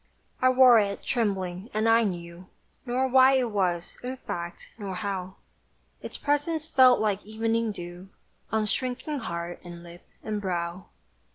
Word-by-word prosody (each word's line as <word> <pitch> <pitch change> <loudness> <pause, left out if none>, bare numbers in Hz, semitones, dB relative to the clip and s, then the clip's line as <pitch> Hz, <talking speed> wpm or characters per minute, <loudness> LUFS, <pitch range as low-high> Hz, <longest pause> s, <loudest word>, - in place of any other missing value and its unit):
I 255 - +5
wore 255 -2 +7
it, 200 -1 -2
trembling, 195 -4 -2
and 215 +1 +1
I 230 +1 +5
knew 175 -2 -5 0.4
Nor 255 +2 +1
why 260 +1 +6
it 255 -3 +1
was, 180 -4 -1
in 255 +1 -5
fact, 170 -8 -7
nor 195 -3 -5
how 190 -2 -4 0.7
Its - - -7
presence 290 +2 0
fell 255 -5 +6
like 210 -2 0
evening 225 +1 -1
dew 175 0 -9 0.4
On 220 0 +1
shrinking 255 +6 -2
heart, 170 -5 -5
and 175 -1 -10
lip 175 +1 -13 0.2
and 210 -1 -3
brow! 175 -1 -3
210 Hz, 150 wpm, -27 LUFS, 180-250 Hz, 0.7 s, wore